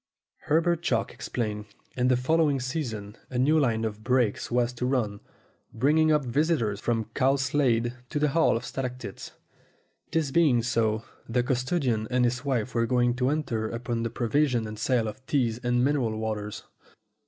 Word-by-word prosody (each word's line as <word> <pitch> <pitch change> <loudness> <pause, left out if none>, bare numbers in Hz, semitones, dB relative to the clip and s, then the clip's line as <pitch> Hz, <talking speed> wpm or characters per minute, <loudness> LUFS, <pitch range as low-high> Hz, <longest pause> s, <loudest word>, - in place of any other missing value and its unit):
Herbert 165 +2 +2
Chalk - - 0
explained. 105 -3 -3 0.3
In 125 0 +1
the 125 -1 +4
following 145 +2 +2
season 120 -6 -4
a 125 - -4
new 150 +5 +4
line 115 -5 +1
of 110 0 -5
brakes 125 -3 +1
was 120 0 +1
to 125 +1 -2
run, 110 -6 0 0.6
bringing 155 +6 +3
up 150 -3 +2
visitors 125 -6 +1
from 115 -1 -1
Cowslade 130 -3 +2 0.2
to - - -3
the 150 0 +2
Hall 160 -4 +3
of 120 - -6
Stalactites. 125 -6 -6 0.8
This 155 -4 0
being 135 -7 +4
so, 115 -2 0 0.3
the 120 +1 +1
custodian 125 -3 0
and 125 0 +2
his 125 +2 -1
wife 125 -4 -1
were 115 -1 +1
going 120 0 +2
to 125 0 +1
enter 120 -8 -1
upon 115 0 -3
the 115 - -1
provision 120 +1 +1
and 110 0 -7
sale 120 -4 +1
of 110 +4 -7
teas 120 -5 +1
and 125 0 +1
mineral 130 -6 0
waters. 105 -1 -4
125 Hz, 165 wpm, -27 LUFS, 115-140 Hz, 0.8 s, the